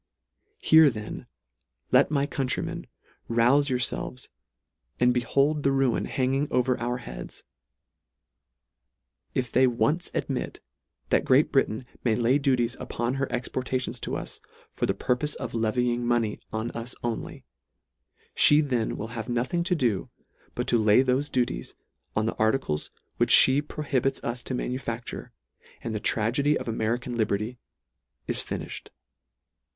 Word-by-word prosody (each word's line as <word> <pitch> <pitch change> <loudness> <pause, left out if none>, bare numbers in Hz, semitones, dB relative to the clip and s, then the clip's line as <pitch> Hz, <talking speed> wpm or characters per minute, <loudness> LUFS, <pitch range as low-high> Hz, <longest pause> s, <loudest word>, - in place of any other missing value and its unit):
Here 160 -1 +6
then, 105 -4 -7 0.6
let 130 +2 +5
my 140 -2 +1
countrymen, 135 -2 -3 0.4
rouse 125 +5 +3
yourfelves, 125 0 -2 0.7
and 125 0 +4
behold 140 +5 +1
the 140 - +2
ruin 135 -3 +1
hanging 135 +2 0
o 125 - +2
ver 125 0 0
their 120 +1 -2
heads. - - -9 1.9
If 125 -3 -1
they 130 +1 +5
ONCE 125 +9 +1
admit, - - -3 0.5
that - - +4
Great 135 +4 +4
Britain 125 -3 +1 0.2
may 115 -3 +2
lay 125 +4 +3
duties 125 -4 +1
upon 120 +1 -2
her 140 - -1
ex 125 0 -2
portations 130 0 -3
to - - -3
us, - - -7 0.3
for - - -1
the - - 0
purpofe 125 +4 -1
of 120 -3 -6
levying 120 +2 0
money 120 -3 +1
on 110 +2 -3
us 115 +1 -6
only, 120 -2 -4 1.0
(lie 150 +1 +6
then 125 -6 -1
will 110 - -5
have 115 -1 -6
nothing 125 +9 0
to 180 -1 +2
do, 120 - 0 0.5
but - - -2
to 120 - +3
lay 105 +4 +5
thofe 130 +3 0
duties 120 - -1 0.4
on 110 - +1
the 115 - -1
arti 110 +4 +4
cles 75 - -4 0.3
which - - +5
fhe 140 +3 +5
prohibits 135 -3 -1
us 120 +1 -3
to 130 - -4
manufacture 125 -2 -4 0.3
— - - -26
and 115 - -3
the 110 - -2
tragedy 125 +9 +1
of - - -7
American 115 +2 -1
liberty 110 +2 -1 0.7
is - - +1
finifh - - -5
ed. - - -13
125 Hz, 145 wpm, -27 LUFS, 115-135 Hz, 1.9 s, Here